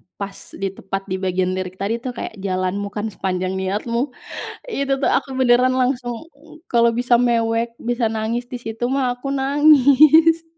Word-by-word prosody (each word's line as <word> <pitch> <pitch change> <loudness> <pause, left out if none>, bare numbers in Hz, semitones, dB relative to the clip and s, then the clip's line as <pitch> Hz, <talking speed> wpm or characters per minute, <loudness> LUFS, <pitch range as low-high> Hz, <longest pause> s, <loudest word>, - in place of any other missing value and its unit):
pas 200 -1 -8
di 195 - -3
tepat 195 0 -5
di 185 - -1
bagian 185 -1 0
lirik 185 0 -5
tadi, 200 +4 -2
tuh, 250 0 -5
kayak, 220 - -6
"Jalanmu 190 +1 -2
kan 215 +1 -3
sepanjang 185 -1 -3
niatmu", 230 +7 -2 0.5
itu, 275 - -1
tuh, - - +1
aku 270 - 0
beneran 255 0 +3
langsung, 250 0 -1 0.4
kalau 235 -1 +3
bisa 240 +1 +2
mewek, 230 -1 +1
bisa 240 0 -1
nangis 225 +2 -2
di 245 0 -7
situ, 225 +1 -4
mah, 260 -2 0
aku 275 +2 -5
nangis. 295 +3 +5
235 Hz, 160 wpm, -20 LUFS, 200-260 Hz, 0.5 s, nangis